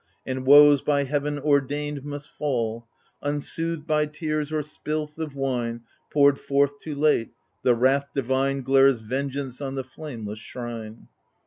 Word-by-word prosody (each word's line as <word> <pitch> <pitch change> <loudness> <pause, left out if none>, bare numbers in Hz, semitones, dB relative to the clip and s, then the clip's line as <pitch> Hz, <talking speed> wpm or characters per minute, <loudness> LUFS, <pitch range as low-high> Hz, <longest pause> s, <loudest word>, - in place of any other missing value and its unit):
And 130 0 -4
woes, 145 0 +8
by 145 -1 +1
heaven 145 +1 -1
ordained, 145 0 0
must 145 0 -7
fall 115 -5 -2 0.2
— - - -37
Unsoothed 165 +2 -2
by 150 -2 +1
tears 150 -1 -3
or 155 -1 0
spilth 150 0 -4
oif 155 -3 -5
wine 120 -4 -2 0.3
Poured 140 -1 +4
forth 140 0 +1
too 155 -2 -6
late, 145 -5 +2 0.3
the 125 -2 +4
wrath 135 +4 +2
divine 135 +1 0
Glares 135 -2 +4
vengeance 135 +2 -4
on 135 -1 -4
the 135 - -2
flameless 120 -6 -8
shrine. 115 -2 -8
140 Hz, 145 wpm, -25 LUFS, 130-150 Hz, 0.3 s, woes